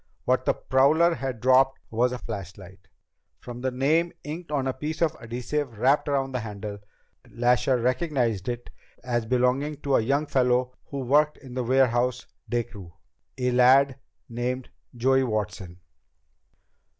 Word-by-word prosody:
What 130 0 +1
the - - +2
prowler 155 +6 +3
had 130 -7 -4
dropped 130 +1 +4
was 120 +3 +2
a 125 - -3
flashlight. 95 -3 -9 0.5
From 120 0 -9
the 130 - 0
name 155 +7 +1
inked 160 +4 -7
on 140 -3 0
a 130 - -1
piece 155 +3 -5
of 165 -2 +1
adhesive 120 +2 -4
wrapped 135 +6 +2
around 135 -1 0
the 125 - -2
handle, 105 -2 -6 0.5
Lasher 125 +2 +2
recognized 125 - 0
it 120 0 -5 0.3
as 120 -2 -1
belonging 130 +4 +1
to 140 -2 +2
a - - +2
young 140 +6 +1
fellow 125 -2 +1
who 140 -1 -5
worked 150 +4 +2
in 130 -3 -12
the 125 0 -2
warehouse 125 0 +2 0.2
day 120 -1 +1
crew, 95 -6 -12 0.4
a 125 -1 0
lad 130 +2 +5 0.3
named 125 +2 -4 0.3
Joey 130 +2 +3
Watson." 105 -6 -4
125 Hz, 150 wpm, -26 LUFS, 120-135 Hz, 0.5 s, lad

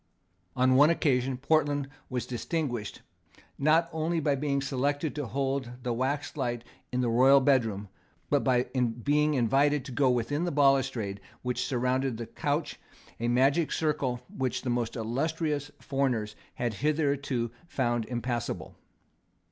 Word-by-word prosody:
On 130 0 +4
one 145 +4 +7
occasion 130 -6 +1
Portland 145 0 +1 0.2
was 125 -2 -2
distinguished, 120 -3 -3 0.6
not 160 +4 +4
only 160 +1 0
by 145 -2 +1
being 140 0 0
selected 140 +3 -1
to 145 -4 -4
hold 135 0 -1
the 120 - -1
waxlight 130 -1 -2 0.3
in 125 - 0
the 125 - +1
royal 130 +4 +6
bedroom, 115 -7 +1 0.4
but 145 -2 +2
by 125 -2 +3
being 130 +5 +1
invited 135 +3 +2
to 135 - -7
go 135 +1 +2
within 125 +6 0
the 175 - -1
balustrade 135 -8 +2 0.2
which 125 -1 -1
surrounded 130 -1 0
the 115 - -5
couch, 145 +5 -2 0.4
a 120 - -1
magic 135 +6 +3
circle 140 -6 0
which 130 -2 -2
the 125 - -1
most 120 -1 -1
illustrious 145 +5 -1
foreigners 125 -6 -1 0.2
had 120 -2 -1
hitherto 140 -5 0 0.2
found 120 -7 0
impassable. 120 -1 -3
135 Hz, 135 wpm, -29 LUFS, 120-145 Hz, 0.6 s, one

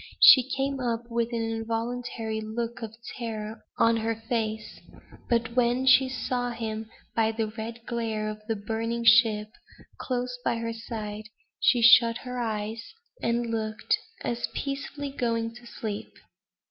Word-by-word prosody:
She 260 -1 +9
came 275 0 -1
up 235 -1 -2
with 235 0 0
an 230 -1 -1
involuntary 225 0 -3
look 230 +3 -4
of 220 -1 -6 0.2
terror 220 -1 -5
on 230 0 +4
her 225 0 -1
face; 220 -1 -3 0.5
but 235 0 +1
when 250 +1 +2
she 260 0 +6
saw 250 -1 -2
him 220 -2 -4 0.3
by 225 -1 +3
the 225 0 -1
red 230 +1 -7
glare 225 -3 -2
of 215 0 -5
the 225 - 0
burning 225 +3 -2
ship, 225 -2 +6 0.5
close 250 -1 -2
by - - +1
her 230 0 -3
side, 215 -2 -6 0.3
she 240 -2 +4
shut 230 0 +8
her 250 0 -6
eyes, 220 -1 -2 0.4
and 235 0 0
looked 220 - 0 0.2
as 235 0 -2
if - - -23
peacefully 280 0 -4
going 230 -3 -1
to 240 0 -13
sleep. 215 -3 -5
230 Hz, 145 wpm, -27 LUFS, 220-240 Hz, 0.5 s, She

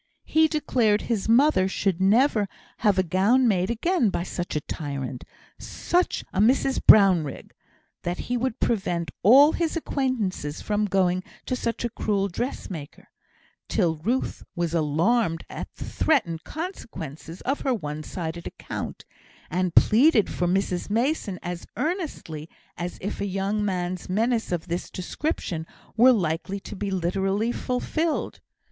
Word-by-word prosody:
He 315 0 +4
declared 240 -9 +1
his 225 -3 -1
mother 240 -5 +5
should 190 -2 -1
never 215 +1 +4 0.3
have 205 -4 +2
a 185 - +4
gown 200 +9 +3
made 185 -4 +2
again 245 - +1
by 175 - -2
such 175 -2 -4
a 150 - 0
tyrant 140 -4 -5 0.4
such 355 +1 -1
a 185 - -1
Mrs 260 +4 +3
Brownrigg; 180 -9 +5 0.5
that 175 +1 -2
he 245 - -1
would 245 0 -1
prevent 175 -6 0
all 275 - +8
his 335 0 -1
acquaintances 230 - -2
from 210 0 0
going 185 -2 +1 0.2
to 255 - -1
such 235 -1 -2
a - - -1
cruel 200 -2 0
dressmaker; 175 - -6 0.6
till 170 -7 +1
Ruth 235 +12 -1
was 170 -2 -1
alarmed 165 +4 +1
at - - -6
the - - -7
threatened 210 - +1
consequences 175 - -7
of 275 +3 -1
her 265 - +1
one 150 -6 -5
sided 170 +1 -5
account, - - -6 0.5
and 180 0 0
pleaded 230 0 +5
for 175 - -1
Mrs 185 0 0
Mason 230 - 0
as 175 -1 -5
earnestly 285 - -3 0.3
as 175 0 -5
if 200 - -4
a 200 - -1
young 195 +2 -1
man's 180 -3 -2
menace 225 +3 0
of 175 -2 -2
this 170 +1 -3
description 180 - -3 0.3
were 245 +3 +7
likely 185 -2 -1
to - - -8
be 200 +1 -3
literally 195 +4 0
fulfilled. 305 +7 -2
195 Hz, 140 wpm, -25 LUFS, 175-245 Hz, 0.6 s, all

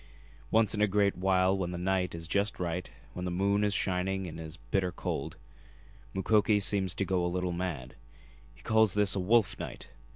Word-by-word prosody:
Once 110 -2 +3
in 105 - -1
a 105 - +5
great 100 0 +2
while 95 +1 +2
when 95 -3 -2
the 90 - -4
night 90 -1 0
is 80 -1 -7
just 100 +4 0
right, 90 0 -3 0.2
when 90 - -5
the 90 - -2
moon 100 +3 +1
is 105 - +2
shining 95 0 0
and 80 -2 -7
it - - -5
is 80 -1 -8
bitter 90 +10 -1
cold, 85 - -4 0.8
Mukoki 105 +2 +3
seems 95 -2 +1
to 100 - -1
go 95 -1 0
a - - +1
little 90 0 -1
mad. 85 -8 -4 0.6
He - - -19
calls 110 -3 +3
this 105 -1 +3
a - - 0
'wolf 105 +2 +2
night.' - - -7
95 Hz, 200 wpm, -30 LUFS, 90-100 Hz, 0.8 s, a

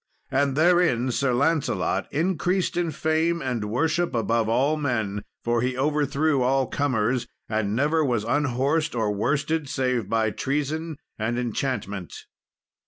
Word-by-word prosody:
And 135 0 +1
therein 160 -7 +3
Sir 135 +1 +1
Lancelot 140 +4 0
increased 180 +3 0
in 175 -1 0
fame 160 +2 0
and 125 -7 -2
worship 160 +5 0
above 115 -1 +1
all 135 +6 +2
men, 110 -9 -1 0.2
for 120 0 +1
he 125 +1 -1
overthrew 145 0 +1
all 135 +1 +2
comers, 125 -3 0 0.2
and 110 -2 -1
never 150 +5 +2
was 120 -6 0
unhorsed 145 +4 0
or 110 -3 +1
worsted, 145 +7 -1
save 125 -7 -1
by 110 -1 +1
treason 150 +6 -2 0.2
and 115 +3 -1
enchantment. 115 -6 -3
135 Hz, 130 wpm, -25 LUFS, 120-155 Hz, 0.2 s, therein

